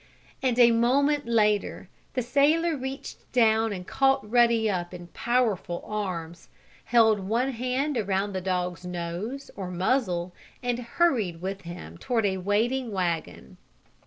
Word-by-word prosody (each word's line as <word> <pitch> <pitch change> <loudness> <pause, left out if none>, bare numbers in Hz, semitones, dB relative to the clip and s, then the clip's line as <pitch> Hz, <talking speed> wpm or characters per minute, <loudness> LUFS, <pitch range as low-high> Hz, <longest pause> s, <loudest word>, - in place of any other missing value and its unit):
And, 255 -3 +1
a 240 -1 +7
moment 275 +5 +2
later, 210 -3 +1 0.3
the 250 - 0
sailor 305 +6 +3
reached 265 0 -7
down 225 -2 +3
and 180 -3 -5
caught 270 +1 +2
Ruddy 235 -1 +4
up 180 -3 -2
in 175 -1 -10
powerful 220 -8 0
arms, 180 -5 -5 0.4
held 220 -3 +4
one 230 +7 0
hand 255 +4 -1
around 200 -1 -1
the 185 - -2
dog's 180 -1 -2
nose, 180 +9 -5
or 190 -2 -5
muzzle, 180 -2 0 0.3
and 245 -1 -1
hurried 235 - +1
with 195 +2 -4
him 125 - -9
toward 230 -4 0
a 190 -1 +1
waiting 225 +6 0
wagon. 170 - -3
220 Hz, 135 wpm, -26 LUFS, 180-250 Hz, 0.4 s, a